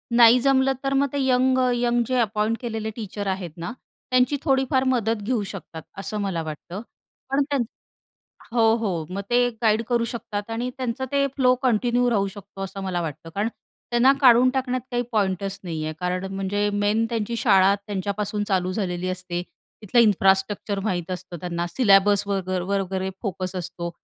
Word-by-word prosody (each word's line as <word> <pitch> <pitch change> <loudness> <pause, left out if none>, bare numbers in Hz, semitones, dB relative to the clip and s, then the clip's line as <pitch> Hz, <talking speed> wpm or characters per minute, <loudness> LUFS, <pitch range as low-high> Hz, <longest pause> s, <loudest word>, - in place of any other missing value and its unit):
नाही 235 +1 +8
जमलं 270 +1 +3
तर 275 0 0
मग 275 +1 +3
ते 285 - -1
यंग-यंग 250 -2 +2
जे 255 - 0
अपॉइंट 215 0 0
केलेले 225 -3 -3
टीचर 205 -2 -5
आहेत 190 -3 -3
ना 170 +1 -5 0.4
त्यांची 255 +3 +3
थोडीफार 265 -2 +2
मदत 230 -4 +1
घेऊ 230 +1 0
शकतात 190 -5 -8 0.2
असं 205 +2 -4
मला 190 -4 -1
वाटतं. 160 +5 -7 0.5
पण 275 +1 +2
त्यांचं 270 -5 0 0.9
हो, 225 -1 +5
हो. 190 -8 -2
मग 200 - -2
ते 245 0 +3
गाईड 220 -1 +3
करू 235 -1 +2
शकतात 215 -3 -5
आणि 245 +2 -2
त्यांचं 260 0 -2
ते 280 0 +2
फ्लो 255 -2 +4
कंटिन्यू 245 0 +2
राहू 200 -4 +1
शकतो 195 0 -10
असं 195 +1 -6
मला 180 -2 -1
वाटतं. 165 0 -6
कारण 200 +6 -1 0.4
त्यांना 240 +3 +5
काढून 250 -1 +7
टाकण्यात 255 -1 -1
काही 245 0 0
पॉइंटच 195 -2 -1
नाहीये 155 -3 -3
कारण 180 +1 -2
म्हणजे 200 +2 0
मेन 205 +2 +1
त्यांची 230 0 -2
शाळा 195 -2 +5
त्यांच्यापासून 205 +1 -2
चालू 185 -2 +1
झालेली 185 -3 -2
असते 180 -1 -3 0.4
तिथलं 215 +3 +2
इन्फ्रास्ट्रक्चर 200 -1 +2
माहीत 180 -4 -2
असतं 180 -1 -6
त्यांना 175 -1 -2
सिल्याबस 200 0 +4
वगर 185 -2 -1 0.2
वगैरे 190 0 -3
फोकस 185 -3 -4
असतो 175 -1 -4
210 Hz, 160 wpm, -24 LUFS, 190-245 Hz, 0.9 s, नाही